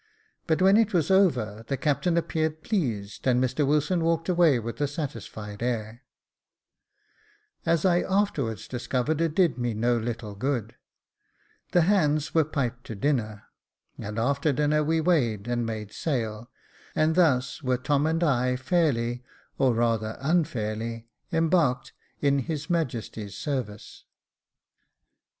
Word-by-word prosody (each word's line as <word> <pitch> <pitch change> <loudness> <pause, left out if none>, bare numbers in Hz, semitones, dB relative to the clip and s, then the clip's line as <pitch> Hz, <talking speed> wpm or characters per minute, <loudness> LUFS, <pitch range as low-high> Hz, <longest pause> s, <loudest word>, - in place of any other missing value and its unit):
But 165 +2 +2
when 195 +2 +6
it 220 -3 +2
was 170 +2 +2
over, 125 - +2
the 135 - -1
captain 155 +5 +1
appeared 160 -1 -1
pleased, 115 - -2
and 125 -1 +4
Mr 130 +3 +1
Wilson 150 +4 +1
walked 165 +1 0
away 170 -6 +4
with 115 +4 -5
a 145 - +2
satisfied 115 -8 -6
air.. 115 -1 -3 1.6
Jacob - - -35
Faithful 165 - +2
^$y - - +6
As 170 +2 0
I 175 -1 +4
afterwards 150 - 0
discovered 130 +5 -1
it 165 -2 0
did 165 -10 +2
me 120 -2 -1
no 120 +3 +2
little 115 -2 -4
good. 120 0 -2 1.0
The 175 - +4
hands 155 -5 +2
were 160 - +4
piped 125 -5 -3
to 110 - -6
dinner, 110 -4 -1 0.6
and 105 +2 -6
after 140 +6 +1
dinner 150 +2 +2
we 160 +2 +1
weighed 120 - +1
and 120 -1 -1
made 110 -2 -5
sail, 115 -6 -3 0.5
and 155 +1 +3
thus 140 -7 +2
were 130 -2 +1
Tom 145 +3 +1
and 165 +2 0
I 125 -4 +2
fairly, 125 -4 0 0.4
or 130 -3 +3
rather 115 -2 0
unfairly, 115 -7 -1 0.2
embarked 165 -5 +1 0.3
in 140 -1 +3
his 150 +3 -4
Majesty's 115 - -3
service. 125 -8 -5
135 Hz, 140 wpm, -26 LUFS, 115-160 Hz, 1.6 s, when